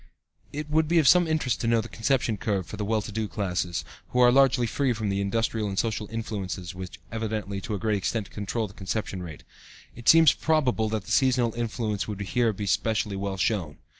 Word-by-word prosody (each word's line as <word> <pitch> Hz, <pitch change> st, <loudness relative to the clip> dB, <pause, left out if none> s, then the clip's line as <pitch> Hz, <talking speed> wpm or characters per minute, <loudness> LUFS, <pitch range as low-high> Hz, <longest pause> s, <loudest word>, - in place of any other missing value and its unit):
It 150 Hz, +1 st, -5 dB
would 155 Hz, +1 st, +2 dB
be 170 Hz, +2 st, +2 dB
of 155 Hz, -4 st, +4 dB
some 180 Hz, +2 st, +6 dB
interest 155 Hz, -6 st, 0 dB
to 115 Hz, -, -1 dB
know 115 Hz, 0 st, +3 dB
the 110 Hz, -, -4 dB
conception 120 Hz, -1 st, 0 dB
curve 100 Hz, -2 st, -1 dB
for -, -, -8 dB
the 105 Hz, -, -3 dB
well 110 Hz, 0 st, 0 dB
to 105 Hz, -, -7 dB
do 110 Hz, +1 st, -2 dB
classes, 90 Hz, -4 st, -2 dB, 0.2 s
who 125 Hz, -, -1 dB
are 125 Hz, -1 st, +7 dB
largely 135 Hz, -1 st, +4 dB
free 125 Hz, +3 st, 0 dB
from 110 Hz, -2 st, -2 dB
the 100 Hz, 0 st, 0 dB
industrial 110 Hz, +1 st, 0 dB
and 95 Hz, -1 st, -4 dB
social 110 Hz, -2 st, -1 dB
influences 100 Hz, -5 st, -4 dB
which 95 Hz, 0 st, -8 dB
evidently, 110 Hz, -3 st, -3 dB
to 105 Hz, -, -3 dB
a -, -, -2 dB
great 105 Hz, +1 st, 0 dB
extent, 100 Hz, +2 st, -2 dB
control 105 Hz, +2 st, -3 dB
the 100 Hz, -, -15 dB
conception 100 Hz, -1 st, -4 dB
rate. 80 Hz, -4 st, -9 dB, 0.5 s
It 120 Hz, -, 0 dB
seems 165 Hz, -2 st, +8 dB
probable 130 Hz, -8 st, +1 dB
that 110 Hz, -2 st, -2 dB
the -, -, -7 dB
seasonal 125 Hz, -3 st, +3 dB
influence 115 Hz, -3 st, -2 dB
would 105 Hz, -2 st, -5 dB
here 115 Hz, +3 st, +1 dB
be 105 Hz, 0 st, -5 dB
specially 105 Hz, +1 st, 0 dB
well 95 Hz, 0 st, -3 dB
shown. 90 Hz, -6 st, -1 dB
110 Hz, 215 wpm, -26 LUFS, 100-120 Hz, 0.5 s, seems